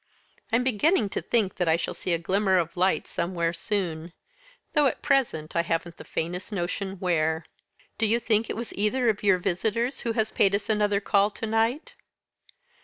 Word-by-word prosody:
I'm 230 +2 +3
beginning 260 - +2
to - - -3
think 215 -6 0
that 180 - 0
I 160 - +5
shall 170 - -3
see 180 - -4
a 170 - +3
glimmer 190 +3 +1
of 170 -2 -1
light 185 +2 +2
somewhere 170 -1 -1
soon 170 -3 -3 0.6
though 295 -2 +4
at - - -3
present 245 - +1
I 170 - +4
haven't 170 0 -3
the - - -10
faintest 180 +5 -4
notion 190 +1 -3
where." 160 -4 0 0.5
"Do 225 - +3
you 230 +3 +2
think 225 -1 +1
it - - -2
was 235 0 -5
either 230 +4 +1
of 210 -2 0
your 195 -3 +4
visitors 220 +8 -1
who 230 - -2
has 220 -1 0
paid 200 0 +3
us 205 +1 -4
another 205 -1 +2
call 200 0 +3
to 220 - -6
night?" 230 - 0
200 Hz, 185 wpm, -26 LUFS, 175-225 Hz, 0.6 s, I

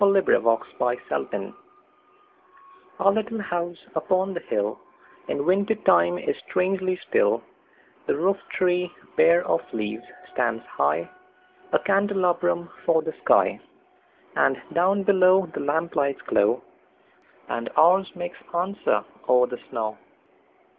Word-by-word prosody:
Our - - +7
Little 195 -1 +4
House 115 0 +1 2.3
OUR 195 - +5
little 220 +1 -2
house 175 -3 -3 0.2
upon 185 +4 0
the 170 - -3
hillIn 105 +6 -5
winter 200 +5 +2
time 85 - +3
is - - -2
strangely 185 0 0
still; 480 +2 +2 0.6
The - - +1
roof 190 +6 +1
tree, 180 -1 0 0.2
bare 170 +1 +5
of - - +1
leaves, 110 +1 -4 0.3
stands - - -1
high,A 370 0 -3
candelabrum 185 -4 +1
for 160 -1 +2
the 160 0 -4
sky, - - +3 0.8
And - - +2
down 190 +3 +2
below 190 -1 +5
the - - -4
lamplights 145 -2 -1
glow, - - +2 0.8
And 115 0 -3
ours 185 +4 +5
makes 175 0 -6 0.2
answer 175 - 0 0.2
o'er 125 0 +6
the 125 0 -7
snow. 110 -3 -3
180 Hz, 115 wpm, -24 LUFS, 155-195 Hz, 2.3 s, Our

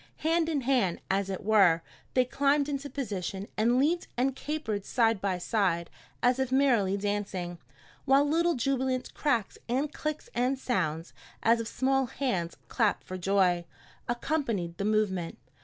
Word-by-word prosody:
Hand 330 0 +2
in 295 -4 0
hand, 240 -9 +1
as 195 0 0
it 190 - -4
were, 195 -6 +4 0.3
they 255 -1 +4
climbed 280 +3 +2
into 285 0 -3
position, 200 -7 -4
and 235 +3 +3
leaped 320 +6 +2
and 260 +1 +1
capered 270 -10 -3
side 225 -2 +2
by 195 -2 0
side 180 -3 0 0.3
as 250 +1 +3
if 265 -1 0
merrily 240 -8 +3
dancing, 195 -4 -3 0.5
while 275 +2 +5
little 335 +3 +2
jubilant 260 0 -1
cracks 240 -9 0
and 275 +5 0
clicks 305 0 -4
and 250 +3 +1
sounds, 170 -11 -2 0.3
as 230 +1 +4
of 230 - -3
small 270 +2 +1
hands 190 -11 -2
clapped 220 -4 +1
for 185 - -7
joy, 185 -1 +2 0.5
accompanied 240 - -1
the 200 - -1
movement. 205 -5 0
230 Hz, 150 wpm, -29 LUFS, 195-270 Hz, 0.5 s, while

